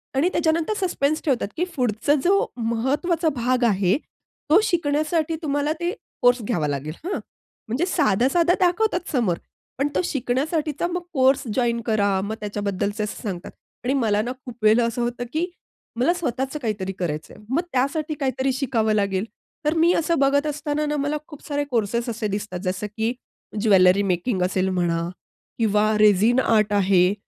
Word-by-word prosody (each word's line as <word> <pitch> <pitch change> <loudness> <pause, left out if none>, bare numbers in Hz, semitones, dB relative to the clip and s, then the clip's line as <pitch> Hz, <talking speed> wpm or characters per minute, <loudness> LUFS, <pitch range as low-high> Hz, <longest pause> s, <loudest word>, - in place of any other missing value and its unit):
आणि 320 +7 +3
त्याच्यानंतर 330 +3 +1
सस्पेन्स 310 -2 0
ठेवतात, 255 -8 +1
की 350 - +1
पुढचा 245 +2 +1
जो 395 +3 +3
महत्वाचा 280 +9 0
भाग 250 +1 +1
आहे, 195 -1 +3 0.5
तो 345 +7 +7
शिकण्यासाठी 315 -1 0
तुम्हाला 290 +1 0
ते 345 +1 0 0.3
कोर्स 245 0 +4
घ्यावा 175 -10 0
लागेल 145 +2 -3
हां. 395 - -2 0.5
म्हणजे 260 +11 0
साधा-साधा 300 - +2
दाखवतात 360 0 +1
समोर, 220 - +1 0.4
पण 280 +2 +1
तो - - +3
शिकण्यासाठीचा 295 +4 -1
मग 355 0 -3
कोर्स 265 0 +3
जॉइन 235 -2 +1
करा. 200 -4 +2
मग 215 +2 -3
त्याच्याबद्दलच 205 0 -2
असं 210 - -4
सांगतात. 185 -4 -5 0.3
आणि 260 +2 +1
मला 215 -6 +2
ना, 240 +3 -3
खूप 245 -2 -8
वेळेला 225 +2 +5
असं 235 +1 -2
होतं 240 0 -2
की 330 +3 +1 0.5
मला 335 +8 +3
स्वतःच 270 -4 -2
काहीतरी 205 -4 -2
करायचं 155 -3 -3
आहे. - - -15
मग 300 +6 +1
त्यासाठी 295 +4 0
काहीतरी, 265 0 0
शिकावं 230 -5 0
लागेल. 200 -1 0 0.4
तर 305 - +3
मी 335 +2 +5
असं 330 -2 +1
बघत 280 +2 +3
असताना 295 0 -2
ना, 295 0 -1
मला 290 +2 0
खूप 295 -3 -12
सारे 290 -1 -1
कोर्सेस 235 +1 0
असे 220 -1 -2
दिसतात. 200 -3 -4
जसं 185 +3 -2
की 225 +2 0 0.5
ज्वेलरी 195 -2 +5
मेकिंग 180 +2 -1
असेल 185 +1 +1
म्हणा 170 -2 0 0.5
किंवा 215 -1 +3
रेझीन 215 +4 +5
आर्ट 215 -4 +2
आहे, 190 -1 +4
245 Hz, 160 wpm, -23 LUFS, 205-300 Hz, 0.5 s, तो